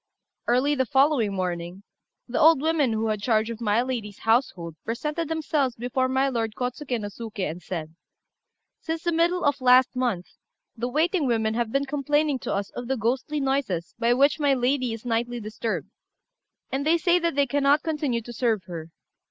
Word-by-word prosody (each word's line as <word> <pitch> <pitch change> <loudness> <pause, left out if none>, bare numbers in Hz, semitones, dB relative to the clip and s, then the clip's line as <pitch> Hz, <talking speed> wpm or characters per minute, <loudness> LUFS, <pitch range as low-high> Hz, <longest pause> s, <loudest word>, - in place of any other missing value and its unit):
Early 255 +5 +3
the 260 -3 0
following 265 -6 +3
morning, 180 0 -3 0.4
the 240 - -2
old 320 -2 +6
women 305 -4 +2
who 220 0 0
had 210 -1 -1
charge 220 0 +1
of 230 0 -8
my 220 +1 +2
lady's 230 -6 -4
household 225 - 0
presented 300 +8 -3
themselves 300 -5 0
before 250 +2 -1
my 265 +1 +2
lord 225 -4 -2
Kôtsuké 250 0 -3
no 205 - -4
Suké, 210 -2 -5
and 170 +3 -9
said 160 -3 -5 0.9
"Since 325 0 -4
the 345 - +1
middle 340 +2 +2
of 285 -1 +1
last 255 0 +5
month, 240 -9 -1 0.5
the 240 +2 -3
waiting 315 +2 +1
women 220 -2 +1
have 235 -1 -1
been 275 +2 +1
complaining 290 0 0
to - - -4
us 200 0 -2
of 245 - -6
the 265 +1 0
ghostly 255 +7 -1
noises 265 -11 -1
by 235 +1 +3
which 280 +4 +3
my 285 -2 +3
lady 255 0 +1
is 225 +1 -7
nightly 240 +1 -1
disturbed, 220 +1 -4 0.8
and 270 +1 -1
they 320 +3 +3
say 345 +1 +3
that 335 -3 -1
they 285 0 +3
cannot 285 +2 +2
continue 290 -7 -1
to 240 - -9
serve 225 -4 0
her. 170 -2 -7
250 Hz, 185 wpm, -25 LUFS, 220-285 Hz, 0.9 s, old